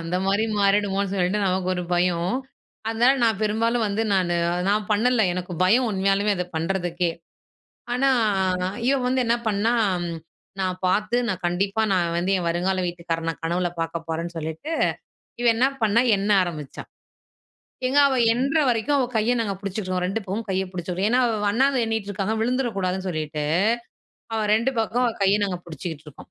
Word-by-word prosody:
அந்த 165 +2 -2
மாதிரி 200 +3 +2 0.2
மாறிடுமோன்னு 200 -1 +1
சொல்லிட்டு 190 +2 +1
நமக்கு 185 0 0
ஒரு 180 - -3
பயம். 175 +2 +1 0.5
அதனால 235 +3 +4
நான் 220 -3 +1
பெரும்பாலும் 230 +2 +1
வந்து 205 +2 -1
நானு. 175 -2 +1 0.3
நான் 210 +1 +1
பண்ணல. 230 +1 +3
எனக்கு 180 0 -5
பயம் 240 +7 +4
உண்மையாலுமே 195 +1 +1
அத 180 - -1
பண்றதுக்கே. 175 0 -1 0.8
ஆனா, 270 +2 +2 0.8
இவ 275 - +4
வந்து 255 +1 +1
என்ன 230 +1 +3
பண்ணா? 215 +2 +1 0.9
நான் 185 -1 -1
பார்த்து, 210 +5 +1
நான் 185 -3 -3
கண்டிப்பா 195 +5 0
நான் 170 -2 +1
வந்து 180 +2 -1
என் 175 - -3
வருங்கால 185 +2 0
வீட்டுக்காரன 165 -1 -3
கனவுல 175 +2 0
பார்க்க 165 0 -4
போறேன்ன்னு 165 +1 -4
சொல்லிட்டு, 160 - -5 0.7
இவ 240 - 0
என்ன 245 +4 +3 0.2
பண்ணா 220 +2 +4
எண்ண 200 +2 -1
ஆரம்பிச்சா. 155 -6 -6 1.0
எங்க 275 +3 +3
அவ 265 - 0 0.2
எண்ணுற 275 +6 +1
வரைக்கும் 245 +5 +1
அவ 265 - +2
கையை 220 +3 +2
நாங்க 200 -3 -2
புடிச்சுக்குவோம், 185 -2 -3
2 195 +4 -1
பக்கமும் 205 +4 -4
கையை 190 0 0
பிடிச்சுக்குவோம். 180 +3 -2
ஏன்னா, 250 +1 +4
அவ 215 -3 -1
அண்ணாந்து 265 +2 +2
எண்ணிட்டு 220 -2 -2
இருக்காங்க 200 +3 -2
விழுந்துரக் 245 -1 -1
கூடாதுன்னு 185 0 -2
சொல்லிட்டு, 155 -2 -3 0.9
அவ 220 - 0
2 235 +5 +2
பக்கமும் 240 +3 +1
அவ 230 - -1
கையை 200 +2 +4
நாங்க 180 -2 -3
புடிச்சுக்கிட்டு 160 -1 -7
இருக்கோம். 145 - -15
195 Hz, 160 wpm, -24 LUFS, 180-225 Hz, 1.0 s, அதனால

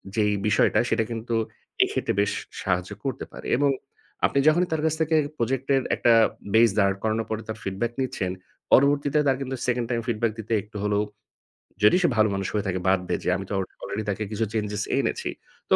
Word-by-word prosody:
যেই 105 -1 +2
বিষয়টা 105 - +3
সেটা 115 - +2
কিন্তু 115 0 -3 0.5
এক্ষেত্রে - - -1
বেশ 100 - +1 0.3
সাহায্য 90 0 -1
করতে 135 -3 -3
পারে - - -9
এবং 145 +1 +3 0.6
আপনি 140 - +2
যখনই 175 +3 +4
তার 160 -1 0
কাছ 160 - +2
থেকে 160 0 +2 0.2
প্রজেক্ট 130 +3 -1
এর 135 - +2
একটা 120 - +4 0.4
বেইস 115 0 +6
দাড় 100 -1 +3
করানোর 110 0 0
পরে 110 0 -2
তার 110 0 -5
ফিডব্যাক 100 +5 -2
নিচ্ছেন, 100 -8 -2 0.4
পরবর্তীতে 140 +2 +4
তার 130 -1 +3
কিন্তু 130 0 -3
2nd 120 -2 0
টাইম 120 -2 0
ফিডব্যাক 115 -1 0
দিতে 110 +1 -3
একটু 105 0 -10
হলেও, 105 0 +1 0.8
যদি 105 - +7
সে 175 - +4
ভালো 110 0 +5
মানুষ 95 -1 -2
হয়ে 105 -1 -1
থাকে 95 -1 -1
বাদ 95 0 +4
দেয় - - -1
যে - - 0
আমি 95 - -6
তো - - -3
অলরেডি 100 +2 -5
তাকে 105 +2 -1
কিছু 110 +1 0
চেঞ্জেস 105 -2 -1
এনেছি। - - -1 0.4
তো - - +7
110 Hz, 195 wpm, -25 LUFS, 105-130 Hz, 0.8 s, যদি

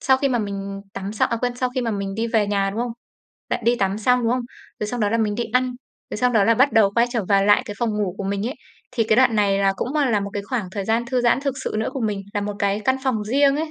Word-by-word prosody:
sau 265 - +4
khi 275 +1 0
mà 245 - +1
mình 200 -2 -4
tắm 195 +1 -5
xong 215 - +1
à 230 - 0
quên, 245 +1 -2
sau 255 0 -1
khi 260 - 0
mà 235 -2 -1
mình 200 -2 -3
đi 225 +2 -1
về 225 -2 +1
nhà, 200 -1 0
đúng 215 - -3
không? 240 -1 -2 0.6
Lại - - -1
đi 240 +1 +3
tắm 195 -1 0
xong, 250 +3 +2
đúng 230 0 +2
không? 250 0 0 0.4
Rồi 210 - -1
xong 240 +3 -4
đó 205 -1 +1
là 230 - +1
mình 215 -2 +1
đi 235 +2 -2
ăn, 255 0 +2 0.4
rồi - - -3
sau 250 +2 +3
đó 220 -4 +3
là 230 - +4
bắt 260 +4 +3
đầu 210 -3 +5
quay 235 +1 +4
trở 230 -5 -1
vào 195 -1 +4
lại 205 +3 +5
cái 210 -5 -6
phòng 235 -2 0
ngủ 205 -4 -2
của 200 - -3
mình 200 +2 -2
ấy. 255 - -3 0.4
Thì 230 -3 +1
cái 215 0 +2
đoạn 250 -3 +4
này 200 -2 +2
là 195 -1 +3
cũng, 260 +10 -3
à, 285 -4 +2
là 210 -3 +2
một 200 - -4
cái 205 - -3
khoảng 215 -3 -3
thời 200 -1 -3
gian 225 +3 +1
thư 255 0 0
giãn 240 +2 +3
thực 275 -2 -2
sự - - -3
nữa 220 - -1
của 270 - -4
mình, 210 -3 -1
là 205 - 0
một 205 0 -3
cái 200 +1 0
căn 260 +3 +3
phòng 230 -6 0
riêng 275 +5 +3
ấy, 310 0 -3
225 Hz, 320 wpm, -22 LUFS, 200-250 Hz, 0.6 s, đầu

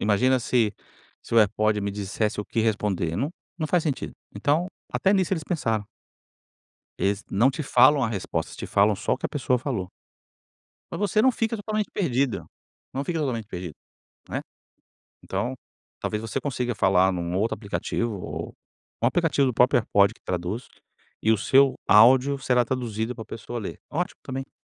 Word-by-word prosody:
Imagina 125 +5 +3
se 115 -4 +1 0.5
se - - -5
o - - +7
AirPod 105 0 +3
me 100 0 -2
dissesse 105 +2 -2
o - - -5
que 115 - -1
responder, 100 -6 0
não 140 +8 -1 0.3
não 155 - -1
faz 175 +1 +2
sentido. 145 -4 -2 0.2
Então, 155 +5 +1 0.3
até 195 - +2
nisso 190 -2 +2
eles 160 -5 -1
pensaram. 115 - -1 1.1
Eles 100 +1 0
não 115 +7 +4
te 140 +3 -2
falam 135 +2 +5
a 115 - +2
resposta, 100 -5 -3
te - - -6
falam 100 +1 +3
só - - -1
o - - +2
que - - -18
a - - +1
pessoa 130 -3 0
falou. 115 -8 -3 1.0
Mas - - -4
você 210 +1 +2
não 260 - +5
fica 225 -1 -1
totalmente 215 0 -2
perdida, 130 - 0 0.5
não 135 - -2
fica 165 +2 -2
totalmente 125 -8 -2
perdido, 90 -5 -6 0.5
né, - - -2 0.8
então, 125 +2 -2 0.5
talvez 105 - -2
você 110 -2 -3
consiga 125 -4 -2
falar 95 -1 +3
em 90 - -3
um 85 +1 -2
outro 110 +3 +1
aplicativo 110 +1 -2
ou - - -6 0.5
um - - +4
aplicativo 155 -2 +2
do 125 - +1
próprio 125 0 +4
AirPod 100 -2 +3
que - - -27
traduz, 90 +6 -3 0.6
e 110 - +3
o 110 - +3
seu 135 +4 +4
áudio 130 +6 +6
será 125 -1 +2
traduzido 115 -1 -2
para 110 - -8
pessoa 115 +2 -6
ler, 105 - -6
ótimo 175 +4 -2
também. 135 0 -6
120 Hz, 175 wpm, -25 LUFS, 105-140 Hz, 1.1 s, o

